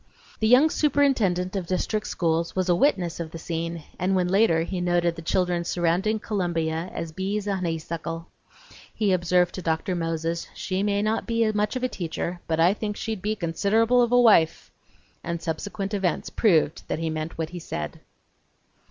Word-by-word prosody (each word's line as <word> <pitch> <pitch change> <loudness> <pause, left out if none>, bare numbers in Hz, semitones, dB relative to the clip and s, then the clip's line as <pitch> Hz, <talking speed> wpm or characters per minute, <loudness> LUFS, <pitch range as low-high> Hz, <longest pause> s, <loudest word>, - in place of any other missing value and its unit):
The 220 - +2
young 265 +7 +6
superintendent 230 - +2
of 185 -3 -3
district 210 +3 -1
schools 165 -1 -1
was 185 -1 0
a 175 - +5
witness 180 - +1
of 165 -2 -4
the 165 - -8
scene, 165 0 -4 0.2
and 185 +2 +1
when 180 -1 +2
later 185 -4 +3
he 180 +1 -3
noted 175 -1 +1
the 165 - -8
children 175 +1 0
surrounding 175 +5 +1
Columbia 175 -6 -2
as 165 - -5
bees 195 +4 -2
a 200 -1 0
honeysuckle, 165 -1 -4 0.7
he 210 -3 0
observed 180 0 +2
to 185 - -5
Dr. 165 +3 -1
Moses: 165 0 -2
"She 185 0 -2
may 205 0 +1
not 215 +1 -1
be 230 -2 +2
much 210 +2 0
of 255 - -3
a - - +3
teacher, 175 -3 -4
but 160 -1 0
I 175 +4 +5
think 210 -1 -4
she'd 220 -4 -4
be 210 +2 -1
considerable 215 +7 +2
of 240 -1 +2
a 245 - +5
wife!" 205 -9 +4 0.5
and 170 0 -3
subsequent 195 +5 -4
events 190 -5 -1
proved 165 -8 +2
that - - -2
he 160 0 -2
meant 155 +1 -4
what 160 0 -3
he 175 - -6
said! 75 - -5
180 Hz, 180 wpm, -25 LUFS, 165-210 Hz, 0.7 s, young